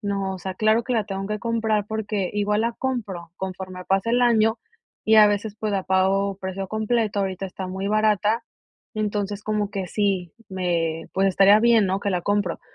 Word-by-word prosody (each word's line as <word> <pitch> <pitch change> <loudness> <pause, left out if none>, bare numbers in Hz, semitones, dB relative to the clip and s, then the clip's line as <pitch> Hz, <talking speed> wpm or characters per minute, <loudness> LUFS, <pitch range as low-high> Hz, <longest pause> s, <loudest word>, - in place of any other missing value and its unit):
"No, 195 -1 -2
o - - -7
sea, 190 0 -5
claro 215 +3 +2
que 255 - -1
la 220 -3 +1
tengo 195 -1 -4
que 210 0 -3
comprar" 220 -3 0
porque 210 -3 -2
igual 210 +1 +1
la 235 - 0
compro 205 -10 -4
conforme 185 -1 -6
pasa 195 +4 0
el 245 +1 +3
año 225 -1 +3 0.5
y 220 - +4
a 215 -1 +9
veces, 205 +1 -1
pues, 215 -1 -2
la 195 -1 0
pago 190 +1 +1
precio 190 0 -5
completo, 220 -1 0
ahorita 190 0 -2
está 190 0 -6
muy 190 +2 -4
barata, 215 +1 +2 0.5
entonces, 205 -1 -2
como 210 -1 -1
que 195 -2 -4
sí, 190 -3 -1 0.2
me, 170 -3 -1
pues, 195 +1 +3
estaría 195 +2 +6
bien, 230 -3 +4
¿no? 190 +1 0
Que 200 - -2
la 180 -1 0
compro. 205 -2 -1
200 Hz, 195 wpm, -23 LUFS, 190-215 Hz, 0.5 s, a